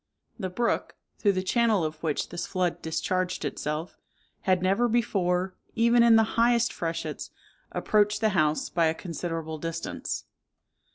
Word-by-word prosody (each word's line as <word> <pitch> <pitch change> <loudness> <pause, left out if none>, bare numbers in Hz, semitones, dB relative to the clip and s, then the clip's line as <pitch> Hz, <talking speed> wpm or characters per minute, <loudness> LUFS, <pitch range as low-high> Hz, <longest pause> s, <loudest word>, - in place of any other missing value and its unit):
The 190 -3 -2
brook, 235 +6 -1 0.2
through 205 -3 +3
the 185 0 -1
channel 220 -2 +2
of 155 0 -4
which 155 -3 -1
this 175 - -4
flood 180 -3 -1
discharged 185 +3 -1
itself, 150 +4 -4 0.4
had 185 -1 +2
never 195 +6 +3
before, 190 -5 +1 0.2
even 235 +1 +4
in 235 -1 +7
the 225 +1 +2
highest 235 0 +3
freshets, 165 -1 -4 0.4
approached 210 -1 +2
the 220 - +3
house 155 -6 +1
by 165 -1 +2
a 160 - 0
considerable 165 -3 -4
distance. 165 +1 -4
185 Hz, 145 wpm, -27 LUFS, 165-220 Hz, 0.4 s, in